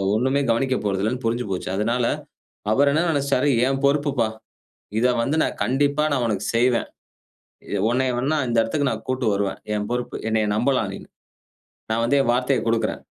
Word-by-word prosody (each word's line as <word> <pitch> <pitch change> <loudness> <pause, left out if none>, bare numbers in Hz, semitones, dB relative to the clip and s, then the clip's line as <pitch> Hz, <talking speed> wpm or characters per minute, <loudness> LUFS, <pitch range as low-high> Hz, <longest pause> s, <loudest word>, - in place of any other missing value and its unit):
ஒண்ணுமே 130 +5 +1
கவனிக்கப் 130 +1 0
போறதில்லன்னு 105 +5 -1
புரிஞ்சு 120 +2 0
போச்சு. 90 - -3
அதனால 115 +4 0 0.7
அவரு 140 +6 +4
என்ன 160 +3 +2
நினச்சுட்டாரு, 140 -1 +1 0.2
என் 135 0 0
பொறுப்புப்பா! 140 -4 +2 0.7
இத 120 - +2 0.2
வந்து 140 +5 0
நான் - - -2
கண்டிப்பா 145 +3 +1
நான் 130 -3 +1
உனக்கு 105 -2 -2
செய்வேன். 120 +1 +2 0.9
எ - - +1
உன்னைய 130 +2 +1
வேணா 145 +5 0
இந்த 120 -1 0
இடத்துக்கு 140 +5 0
நான் - - -5
கூட்டிட்டு 130 -4 0
வருவேன், 100 -1 -2 0.2
என் 105 0 -2
பொறுப்பு. 125 0 -3
என்னைய 110 -1 +1
நம்பலாம் 130 +4 +1
நீனு! - - -9 0.8
நான் 115 +1 +1
வந்து 140 +4 +3
என் 120 - +1
வார்த்தையக் 125 0 0
கொடுக்கிறேன். 115 -1 0
125 Hz, 165 wpm, -23 LUFS, 115-140 Hz, 0.9 s, அவரு